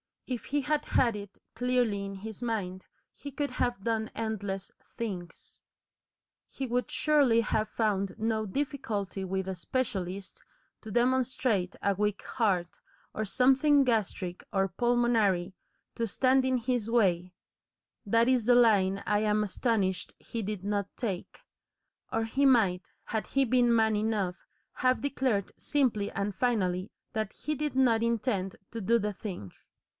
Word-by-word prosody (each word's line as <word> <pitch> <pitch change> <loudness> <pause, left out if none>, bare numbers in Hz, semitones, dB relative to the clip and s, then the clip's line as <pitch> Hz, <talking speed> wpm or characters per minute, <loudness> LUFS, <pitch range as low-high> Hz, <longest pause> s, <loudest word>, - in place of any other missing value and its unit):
If 250 -3 -4
he 290 +1 0
had 300 +1 0
had 235 -4 +2
it 200 -1 -10
clearly 245 -5 +1
in 195 0 -6
his 220 +3 -8
mind 195 -6 -3 0.3
he 285 - -8
could 285 +1 -2
have 240 -5 -1
done 220 -1 0
endless 205 -4 -3 0.3
things. 185 -8 -6 0.9
He 270 - -4
would 250 0 -1
surely 280 -7 +3
have 215 -1 0
found 200 -4 -1
no 220 -1 0
difficulty 210 -6 -3
with 190 0 -2
a 190 - -2
specialist 195 - -3 0.4
to 220 - -9
demonstrate 245 -5 +1
a 200 - +3
weak 210 +1 -1
heart, 190 -8 0 0.3
or 215 - -2
something 270 +6 +4
gastric 200 -7 -1
or 195 0 +2
pulmonary, 220 -4 +2 0.4
to 230 - -1
stand 260 +4 +3
in 260 -1 +2
his 240 -2 -1
way 185 -6 +2 0.7
that 230 +4 +3
is 250 -4 +2
the 245 +1 +5
line 200 -5 +4
I 210 0 +2
am 210 0 +2
astonished 195 -3 -1
he 230 - -5
did 205 -2 -4
not 200 -1 -1
take, 205 - -4 0.7
or 225 - 0
he 265 +5 +1
might, 200 -9 +3
had 220 -2 -3
he 275 - +2
been 245 -1 +3
man 220 -1 +3
enough, 210 -4 -1 0.3
have 255 0 +2
declared 260 -8 0
simply 245 -8 +1
and 200 +1 -2
finally 190 -4 0 0.2
that 215 -2 -2
he 305 - -3
did 300 -1 -2
not 240 -4 +4
intend 220 -5 0 0.2
to 230 - -5
do 230 +4 +3
the 210 -2 -2
thing. 180 - -7
220 Hz, 145 wpm, -29 LUFS, 195-245 Hz, 0.9 s, the